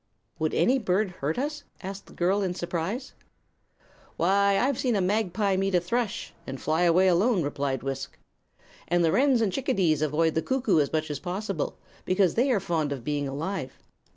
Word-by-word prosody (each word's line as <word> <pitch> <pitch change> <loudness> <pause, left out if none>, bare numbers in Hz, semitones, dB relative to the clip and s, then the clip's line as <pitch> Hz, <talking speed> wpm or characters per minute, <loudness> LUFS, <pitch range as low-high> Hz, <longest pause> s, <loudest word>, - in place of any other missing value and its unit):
"Would 155 0 0
any 265 +2 +3
bird 195 -2 0
hurt 145 +3 -1
us?" 295 +3 -3 0.2
asked 195 +1 -7
the - - -15
girl, 190 +4 +1
in 185 -2 -1
surprise. 180 - -3 1.0
"Why, 200 +3 +3
I've 260 +3 +1
seen 245 -4 +1
a - - +2
magpie 195 0 +1
meet 195 0 +1
a - - +5
thrush, 210 +4 -2
and 135 0 -5
fly 155 +3 0
away 180 +2 +4
alone," 185 +2 +3
replied 140 -3 -2
Wisk. 135 -1 -5 0.7
"And 175 0 +2
the 160 - +3
wrens 265 - +3
and 205 -5 +1
chickadees 190 - +1
avoid 155 +2 +1
the 160 - +1
cuckoo 250 -8 +1
as 145 - +1
much 155 -1 -1
as 145 - -4
possible, 210 - -3 0.3
because 185 -1 +2
they 250 +4 +2
are 225 - +3
fond 165 -6 -1
of 135 -4 -4
being 145 +1 -1
alive. 140 0 -4
185 Hz, 180 wpm, -27 LUFS, 160-215 Hz, 1.0 s, a